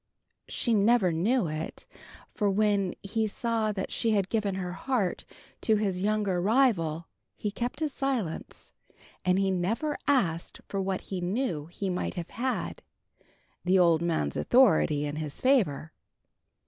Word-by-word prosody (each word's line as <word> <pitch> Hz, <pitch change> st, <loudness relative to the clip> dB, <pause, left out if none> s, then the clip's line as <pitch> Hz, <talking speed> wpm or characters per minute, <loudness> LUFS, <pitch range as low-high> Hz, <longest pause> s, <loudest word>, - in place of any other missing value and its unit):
She 235 Hz, -, 0 dB
never 210 Hz, -2 st, +4 dB
knew 205 Hz, +8 st, +1 dB
it, 155 Hz, +1 st, -5 dB, 0.5 s
for 205 Hz, -2 st, +1 dB
when 200 Hz, -2 st, +1 dB
he 220 Hz, +2 st, 0 dB
saw 225 Hz, 0 st, 0 dB
that 190 Hz, -2 st, -4 dB
she 230 Hz, -, 0 dB
had 195 Hz, -2 st, +1 dB
given 205 Hz, -4 st, 0 dB
her 180 Hz, -2 st, -3 dB
heart 205 Hz, -1 st, -1 dB, 0.4 s
to 220 Hz, -, +3 dB
his 195 Hz, -4 st, -1 dB
younger 205 Hz, -3 st, +1 dB
rival, 180 Hz, -, +2 dB, 0.3 s
he 210 Hz, -, -3 dB
kept 250 Hz, +8 st, -2 dB
silence, 265 Hz, -, -3 dB, 0.5 s
and 180 Hz, 0 st, +3 dB
he 195 Hz, 0 st, +2 dB
never 220 Hz, -, -1 dB
asked 180 Hz, -, +1 dB
for 195 Hz, -, -2 dB
what 190 Hz, -1 st, -2 dB
he 185 Hz, -2 st, -5 dB
knew 175 Hz, -, -1 dB
he 195 Hz, +3 st, -5 dB
might 180 Hz, -, -2 dB
have 175 Hz, -2 st, -5 dB
had 260 Hz, -, -2 dB, 0.8 s
the 185 Hz, +1 st, +3 dB
old 170 Hz, -3 st, +4 dB
man's 160 Hz, -, 0 dB
authority 160 Hz, -, +4 dB
in 145 Hz, +1 st, -4 dB
his 155 Hz, -2 st, -5 dB
favor. 190 Hz, -, +2 dB
195 Hz, 145 wpm, -28 LUFS, 175-230 Hz, 0.8 s, never